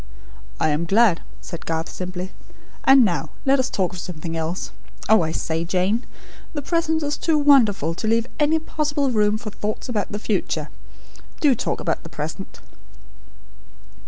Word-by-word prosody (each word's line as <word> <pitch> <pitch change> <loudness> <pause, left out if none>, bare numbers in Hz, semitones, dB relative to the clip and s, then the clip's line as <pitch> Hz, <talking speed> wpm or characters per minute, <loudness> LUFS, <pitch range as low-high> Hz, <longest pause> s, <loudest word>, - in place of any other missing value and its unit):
'" - - -20
"I - - +2
am 155 +3 0
glad," 200 -1 +4 0.2
said 170 - -8
Garth, 165 0 -1
simply. 185 0 -5 0.5
"And 270 -2 +8
now, 175 -4 -1 0.2
let's 270 -1 +3
talk 185 -3 -1
of 180 - -6
something 165 -2 -5
else. 165 +3 -3 0.4
Oh, 220 -1 +6
I 160 -1 -1
say, 165 0 -1
Jane! 185 +7 0 0.5
The 290 -2 -4
present 320 0 +1
is 290 0 -1
too 320 -2 +2
wonderful, 230 - +4
to 220 - -4
leave 230 +1 +2
any 305 +2 +3
possible 295 -3 -1
room 210 -2 +2
for 215 -1 -7
thoughts 215 +5 -4
about 215 -4 -1
the 205 - -2
future. 210 -2 -1 0.7
Do 290 -3 +5
talk 235 - -2
about - - -1
the - - -10
present." - - -6
210 Hz, 160 wpm, -23 LUFS, 175-275 Hz, 0.7 s, And